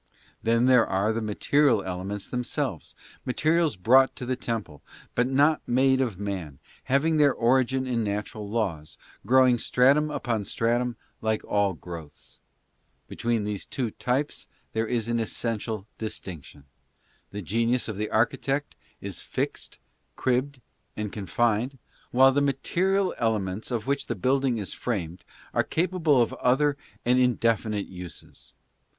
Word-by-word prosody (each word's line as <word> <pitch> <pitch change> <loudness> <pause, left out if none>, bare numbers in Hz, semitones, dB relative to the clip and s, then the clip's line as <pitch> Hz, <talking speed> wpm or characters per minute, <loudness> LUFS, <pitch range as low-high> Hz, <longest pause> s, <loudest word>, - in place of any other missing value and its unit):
Then 115 +2 +2
there 125 -3 +5
are 100 +4 +1
the 115 - -2
material 110 +2 +2
elements 95 +2 -4
themselves, 125 -2 -3 0.3
materials 155 +2 +1
brought 130 +8 +4
to 125 - -6
the 130 +1 -1
temple, 110 - -4 0.3
but 120 - +2
not 145 +4 +3
made 130 +2 +3
of 115 -8 -2
man, 95 -9 -4 0.3
having 155 +4 +2
their 145 -2 +4
origin 130 +2 +2
in 120 -3 0
natural 105 0 -4
laws, 95 -9 -2 0.3
grow 130 +2 +6
ing 120 -1 +3
stratum 140 +7 +3
upon 115 -7 -2
stratum, 120 +3 0 0.2
like 110 -1 0
all 100 -2 +1
growths. 80 -6 -11 0.7
Between 115 -2 -1
these 105 -1 -3
two 125 -5 -2
types 135 +7 -2 0.3
there 110 0 0
is 115 -2 -1
an 120 0 0
essential 110 -2 -2
distinction. 80 - -7 0.6
The 105 0 -6
genius 115 +7 +1
of 110 - -4
the 105 +2 -3
archi 110 +2 +2
tect 140 +1 -2 0.3
is - - -5
fixed, - - -4 0.4
cribbed 130 +1 0 0.4
and 105 -1 -4
confined, 115 +5 0 0.3
while 130 +2 +6
the 145 +2 +2
material 185 +8 +1
elements 105 -3 -1
of 115 -4 -2
which 140 0 -1
the 120 - -2
building 130 +3 +1
is 100 -3 -4
framed 90 -7 -4 0.3
are - - +3
capable 165 -6 +2
of - - -4
other 140 +3 +3 0.3
and 125 +1 +4
indefi 115 -3 +2
nite 105 -2 -2
uses. 90 -3 -10
120 Hz, 145 wpm, -26 LUFS, 105-130 Hz, 0.7 s, grow